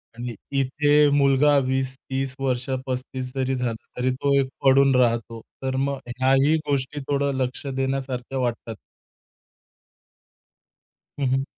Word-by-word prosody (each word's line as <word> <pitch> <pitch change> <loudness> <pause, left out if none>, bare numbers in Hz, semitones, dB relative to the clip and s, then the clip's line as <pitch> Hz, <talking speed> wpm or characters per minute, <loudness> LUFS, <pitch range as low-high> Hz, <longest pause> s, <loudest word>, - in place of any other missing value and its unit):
आणि 120 0 -5 0.2
इथे 145 +2 +1 0.3
मुलगा 140 +1 +4
20-30 130 0 -2
वर्ष, 125 -2 0 0.2
35 130 0 -4
जरी 130 0 0
झाला, 125 -2 -1 0.2
तरी 125 +1 +1
तो 140 +1 0
एक 135 - +1 0.2
पडून 135 0 +5
राहतो. 115 -2 +1 0.2
तर 130 0 -1
मग 140 -1 -3 0.2
ह्याही 135 +4 +4
गोष्टी 140 0 -1
थोडं 140 0 0
लक्ष 130 +3 -5
देण्यासारख्या 135 -1 -3
वाटतात. 120 -2 -3 2.4
हं, 140 - 0
हं. 135 +1 +1
130 Hz, 120 wpm, -24 LUFS, 125-135 Hz, 2.4 s, पडून